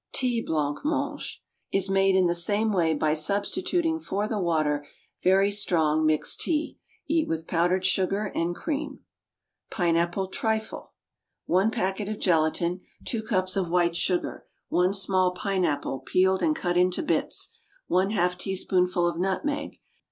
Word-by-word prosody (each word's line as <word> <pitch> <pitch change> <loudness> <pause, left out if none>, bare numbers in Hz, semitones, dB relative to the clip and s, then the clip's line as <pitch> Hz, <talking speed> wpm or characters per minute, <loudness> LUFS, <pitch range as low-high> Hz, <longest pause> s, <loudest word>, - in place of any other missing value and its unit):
Tea 245 -3 +1
Blanc 150 -6 -1
mange 290 -1 -3 0.3
Is 195 -1 +2
made 195 0 +3
in 190 -1 +4
the 170 - +2
same 205 +5 +1
way 165 -4 +2
by 150 +1 +1
substituting 320 - 0
for 205 -8 -2
the 215 -1 -2
water 155 -5 0 0.4
very 195 +2 +4
strong, 160 -6 +2
mixed 155 -1 +1
tea. 315 -1 -1 0.3
Eat 315 +1 +1
with 160 0 -3
powdered 175 +3 +1
sugar 195 +2 +1
and 175 +1 -1
cream. 290 - -4 0.7
Pineapple 175 +1 0
Trifle. 220 +2 -3 0.5
One 190 +5 +3
package 200 -2 -2
of 215 - -3
gelatine. 170 +1 +1 0.2
Two 230 - -2
cups 185 -4 -1
of 190 -3 -1
white 170 -1 +2
sugar. 180 +1 -1 0.2
One 180 +1 +2
small 185 -2 +1
pineapple, 180 -9 -1
peeled 190 +5 +2
and 310 -1 +2
cut 175 - -1
into 180 0 +2
bits. - - -1 0.4
One 185 +2 +2
half 180 -4 0
teaspoonful 180 -2 +1
of 170 -1 -2
nutmeg. 285 +11 -2
185 Hz, 145 wpm, -26 LUFS, 175-210 Hz, 0.7 s, in